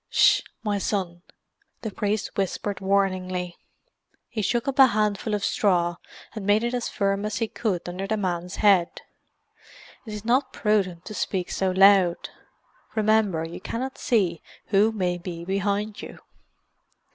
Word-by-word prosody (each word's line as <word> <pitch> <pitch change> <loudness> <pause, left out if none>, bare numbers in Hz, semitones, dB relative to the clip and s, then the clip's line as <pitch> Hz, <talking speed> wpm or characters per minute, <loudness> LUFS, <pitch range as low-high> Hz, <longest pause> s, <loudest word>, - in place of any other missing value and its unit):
"Ss - - +5
h, - - -22 0.2
my 205 -2 0
son!" 185 -4 -2 0.6
the 220 - -3
priest 205 +1 -2
whispered 195 0 -2
warningly. 185 -2 0 0.7
He 220 - -3
shook 235 +5 0
up 275 0 -2
a 265 - +10
handful 210 -1 0
of 200 -1 -2
straw 175 -4 +1 0.4
and 215 - -6
made 205 +3 +3
it 240 +1 -1
as 245 -1 -2
firm 195 0 0
as 210 0 -2
he 225 - 0
could 200 -7 -2
under 185 +2 -4
the 220 - 0
man's 180 -2 -3
head. 195 -5 +3 1.1
"It 215 - -6
is 210 +1 -8
not 255 +4 +1
prudent 190 -5 0
to 215 - -7
speak 185 -3 -2
so 190 - 0
loud. 190 -2 +4 0.7
Remember 215 -6 +2
you 165 - -9
cannot 260 +3 -4
see 185 -8 +1 0.3
who 205 +2 +4
may 180 -4 -1
be 170 -1 -7
behind 200 +2 -1
you." - - -9
200 Hz, 155 wpm, -25 LUFS, 185-215 Hz, 1.1 s, a